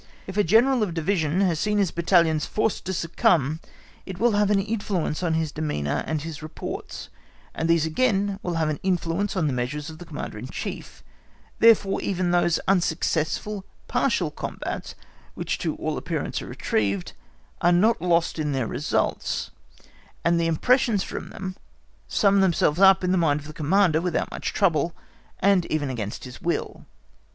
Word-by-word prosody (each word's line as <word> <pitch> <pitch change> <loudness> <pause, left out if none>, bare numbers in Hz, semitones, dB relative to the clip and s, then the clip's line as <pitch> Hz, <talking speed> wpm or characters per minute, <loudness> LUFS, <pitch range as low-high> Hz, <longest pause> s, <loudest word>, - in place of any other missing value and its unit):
If 190 - -7
a 210 - +3
General 235 +7 +4
of 185 -6 -1
Division 165 0 0
has 175 -5 +1
seen 210 +3 +1
his 195 -4 +2
battalions 170 -3 +2
forced 215 0 -1
to 190 - -2
succumb, 165 - +1 0.4
it 190 -2 -7
will 240 +4 +3
have 205 -1 +2
an 205 -1 +3
influence 195 -6 -2
on 165 -3 +1
his 160 -2 -1
demeanour 145 - -2
and 155 -2 -2
his 160 -2 -7
reports, 155 +1 -7 0.4
and 160 - -2
these 165 -2 +4
again 200 +2 +1
will 175 -2 -3
have 160 -1 +1
an 150 - -2
influence 185 +1 -1
on 175 -4 +1
the 145 - 0
measures 145 +5 -3
of 155 - -12
the 175 - -9
Commander 160 -3 -6
in - - -7
Chief; - - -7 0.6
therefore 215 -4 +5
even 185 -2 -1
those 175 -1 +3
unsuccessful 180 +2 0 0.2
partial 230 - +1
combats - - -5 0.4
which - - -3
to - - -2
all - - -3
appearance - - -3
are - - -8
retrieved, 100 -3 -1 0.5
are 175 - +4
not 195 +3 +3
lost 170 -2 +1
in 150 -2 -1
their 130 -3 0
results, - - -1 0.7
and 170 0 +3
the 165 - +1
impressions 220 - +2
from - - -6
them 190 -1 -6 0.5
sum 200 -1 +3
themselves 170 -3 +2
up 190 -1 +6
in 180 - +1
the 185 - +3
mind 150 -3 +2
of 150 - -12
the 155 - -9
Commander 165 +1 +2
without 180 -1 -1
much - - -3
trouble, 165 0 +1 0.5
and 195 -3 +3
even 145 -3 -1
against 110 -4 -5
his 125 -1 -10
will. 170 0 -3
170 Hz, 170 wpm, -25 LUFS, 155-195 Hz, 0.7 s, up